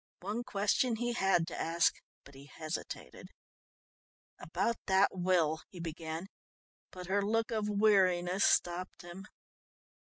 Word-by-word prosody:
One 210 +6 -3
question 235 +2 +1
he 240 +2 -2
had 190 -6 +2
to 170 - -6
ask 165 +1 +2 0.3
but 140 - -16
he 135 +1 -13
hesitated. 155 +1 -7 1.1
"About 235 -1 -1
that 190 0 +4
will 175 -4 +1
" - - -64
he 180 - -11
began, 165 +1 -5 0.6
but 180 -1 -9
her 195 +3 +1
look 225 +3 0
of 215 -2 -1
weariness 195 -3 +3
stopped 175 +1 +1
him. 175 +4 -10
185 Hz, 130 wpm, -32 LUFS, 170-210 Hz, 1.1 s, that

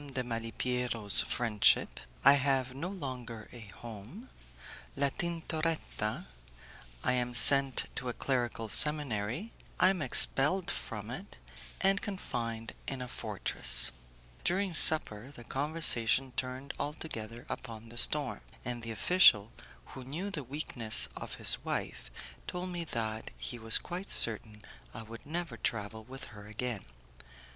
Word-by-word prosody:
de 125 - -1
Malipiero's 115 -1 +2
Friendship 115 -4 +2 0.3
I 140 - +9
Have 135 -2 0
No 145 +7 -5
Longer 125 - -7
a 120 - -11 0.2
Home 120 - -10 0.6
La 140 0 +1
Tintoretta 160 -8 -3 0.8
I 125 - +2
Am 125 -1 -1
Sent 135 +2 +5
to 125 - -4
a - - -3
Clerical 120 -4 -2
Seminary 145 - 0 0.3
I 185 - +5
Am 185 -4 -4
Expelled 150 +6 +6
From - - -6
It, - - -9 0.4
and 195 +1 +2
Confined 115 - -5
in 135 - -5
a - - -7
Fortress 100 - +2 0.5
During 190 +1 0
supper 135 -8 +2
the 130 -4 -12
conversation 135 -3 +2
turned 130 +2 -4
altogether 120 -6 -6
upon 115 0 -8
the 120 - -13
storm, 145 0 +1 0.2
and 120 -1 -4
the 115 - -7
official, 110 - +4 0.4
who 130 - -9
knew 165 +10 -5
the 150 -7 -5
weakness 125 -4 +1
of - - -7
his - - +3
wife, - - -5 0.4
told 180 +1 -5
me 175 -2 -4
that 110 -5 -4
he 120 - -6
was 110 -1 +5
quite 180 +3 -7
certain 110 -1 +2 0.3
I 115 - -7
would 115 +4 -12
never 165 -6 -5
travel 110 0 -4
with 130 +3 -10
her 105 0 -12
again. 110 0 -5
125 Hz, 135 wpm, -31 LUFS, 115-150 Hz, 0.8 s, I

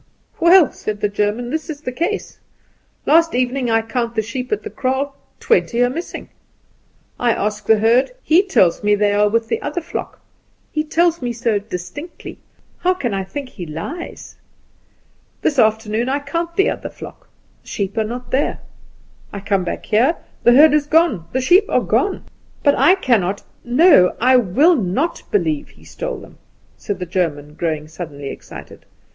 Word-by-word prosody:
"Well," 340 -2 +6
said 210 -1 -5
the 210 - 0
German, 210 +4 -1
"this 315 +2 -3
is 295 -2 -6
the 255 - -4
case. 340 +11 -3 0.7
Last 330 0 +4
evening 250 0 0
I 225 0 +2
count 235 0 -3
the 220 - 0
sheep 250 +3 -5
at 425 - -1
the 430 - -7
kraal 275 +1 -2 0.2
twenty 345 - +1
are 245 - +1
missing. 335 +6 -6 0.9
I 240 -2 +2
ask 210 0 -3
the 220 - +5
herd; 230 +5 +3
he 330 +4 +5
tells 295 - +2
me 205 0 +3
they 205 0 +1
are 210 0 +3
with 225 +1 0
the - - -2
other 295 +4 -3
flock; 345 +1 -6 0.5
he 305 - -1
tells 335 +1 +1
me 245 -1 -2
so 230 -3 0
distinctly; 200 - -8 0.4
how 365 +1 +2
can 245 - -3
I 195 -1 -1
think 260 +8 -7
he 175 -8 -8
lies? 175 - -7 1.1
This 285 -4 +1
afternoon 220 +1 +1
I 275 - +1
count 335 +4 -4
the 390 +4 +3
other - - -5
flock. - - -12 0.3
The - - -25
sheep 200 0 -3
are 220 - +1
not 245 +3 -7
there. 270 +3 0 0.7
I 200 - -6
come 195 -1 0
back 175 - -5
here: 250 +10 +3 0.3
the 240 - +5
herd 295 +3 +7
is 300 -1 +2
gone; 310 - +2
the 260 - -1
sheep 360 +10 +5
are - - +2
gone. 400 -1 0 0.4
But 285 - +5
I 360 - +5
cannot 205 - 0 0.2
no, 250 - +5
I 255 +2 +4
will 260 - +4
not 255 - -1
believe 315 -8 0
he - - -21
stole - - -5
them," - - -14 0.4
said 205 -3 -5
the 180 - -5
German, 160 -5 -2
growing 155 -1 -3
suddenly 155 -4 -7
excited. - - -11
245 Hz, 175 wpm, -19 LUFS, 205-310 Hz, 1.1 s, herd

